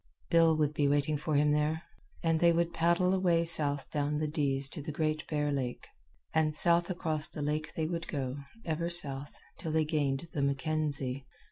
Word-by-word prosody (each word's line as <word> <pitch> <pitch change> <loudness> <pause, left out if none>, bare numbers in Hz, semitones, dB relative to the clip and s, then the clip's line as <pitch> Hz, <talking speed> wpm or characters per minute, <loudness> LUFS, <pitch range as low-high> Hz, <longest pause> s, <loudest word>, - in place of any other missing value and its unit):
Bill 165 -2 +5
would 150 -1 +1
be 145 -1 +1
waiting 145 +1 +1
for 150 +1 -2
him 150 +1 +3
there, 150 +2 0 0.4
and 165 -1 +2
they 170 0 +5
would 170 0 0
paddle 170 +3 +2
away 175 -3 +2
south 145 -4 +4
down 150 0 -1
the 155 0 -1
Dease 140 -3 0
to 150 - -7
the 155 +2 -5
Great 155 0 -2
Bear 150 -1 -1
Lake. 130 -3 -3 0.5
And 155 -1 +2
south 170 +1 +2
across 160 -4 0
the 150 - -6
lake 155 +1 -2
they 160 - -1
would 165 0 -4
go, 135 -2 -3 0.3
ever 170 0 -1
south, 145 -5 0 0.2
till 160 - -4
they 155 0 +2
gained 150 -1 -1
the 145 - -1
Mackenzie. 140 -2 -1
155 Hz, 190 wpm, -31 LUFS, 145-165 Hz, 0.5 s, Bill